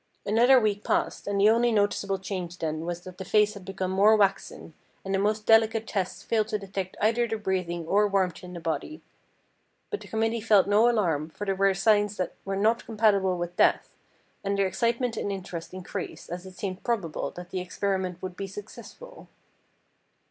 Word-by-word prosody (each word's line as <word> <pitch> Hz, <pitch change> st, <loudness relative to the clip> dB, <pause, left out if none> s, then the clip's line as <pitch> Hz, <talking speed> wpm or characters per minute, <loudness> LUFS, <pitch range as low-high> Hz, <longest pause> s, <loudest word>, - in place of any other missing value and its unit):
Another 240 Hz, +5 st, +5 dB
week 210 Hz, -2 st, 0 dB
passed, -, -, -1 dB
and 200 Hz, -1 st, 0 dB
the 210 Hz, +2 st, +6 dB
only 235 Hz, +1 st, +3 dB
noticeable 205 Hz, -2 st, +1 dB
change 185 Hz, -2 st, -5 dB
then 155 Hz, -1 st, -3 dB
was 175 Hz, 0 st, -3 dB
that 185 Hz, 0 st, -11 dB
the -, -, -4 dB
face 210 Hz, +2 st, +3 dB
had 200 Hz, -3 st, -10 dB
become 190 Hz, -1 st, -3 dB
more 205 Hz, +3 st, +5 dB
waxen, 195 Hz, -5 st, 0 dB, 0.3 s
and 195 Hz, -, -2 dB
the 195 Hz, -, +2 dB
most 210 Hz, +1 st, 0 dB
delicate 225 Hz, 0 st, +4 dB
tests 190 Hz, -4 st, -3 dB
failed 220 Hz, -2 st, +1 dB
to 215 Hz, -1 st, -1 dB
detect 195 Hz, -2 st, -5 dB
either 230 Hz, +2 st, +2 dB
the 225 Hz, -1 st, -2 dB
breathing 180 Hz, -4 st, -2 dB
or 205 Hz, +5 st, +3 dB
warmth 190 Hz, -4 st, 0 dB
in 180 Hz, 0 st, -9 dB
the 175 Hz, -, -6 dB
body. 165 Hz, -, -4 dB, 0.9 s
But 420 Hz, -, -3 dB
the -, -, -11 dB
committee 225 Hz, +1 st, -1 dB
felt 210 Hz, -3 st, +5 dB
no 210 Hz, +4 st, +4 dB
alarm, 165 Hz, -10 st, 0 dB
for 205 Hz, +6 st, -7 dB
there 195 Hz, -, +1 dB
were 195 Hz, 0 st, +2 dB
signs 205 Hz, 0 st, +2 dB
that 185 Hz, -2 st, -2 dB
were 195 Hz, 0 st, -2 dB
not 220 Hz, +4 st, +2 dB
compatible 205 Hz, -4 st, +2 dB
with 175 Hz, 0 st, -4 dB
death, -, -, +2 dB, 0.5 s
and 200 Hz, 0 st, -1 dB
their 200 Hz, -, +3 dB
excitement 235 Hz, +5 st, 0 dB
and 205 Hz, -, -2 dB
interest 185 Hz, -4 st, -6 dB
increased 185 Hz, -2 st, -7 dB
as 180 Hz, +2 st, -6 dB
it 185 Hz, -, -12 dB
seemed 185 Hz, -1 st, -5 dB
probable 200 Hz, -10 st, -2 dB
that 175 Hz, 0 st, -9 dB
the 185 Hz, -, -2 dB
experiment 185 Hz, -1 st, -2 dB
would 185 Hz, -1 st, -5 dB
be 195 Hz, -, -5 dB
successful. 230 Hz, -, -11 dB
195 Hz, 190 wpm, -27 LUFS, 185-215 Hz, 0.9 s, the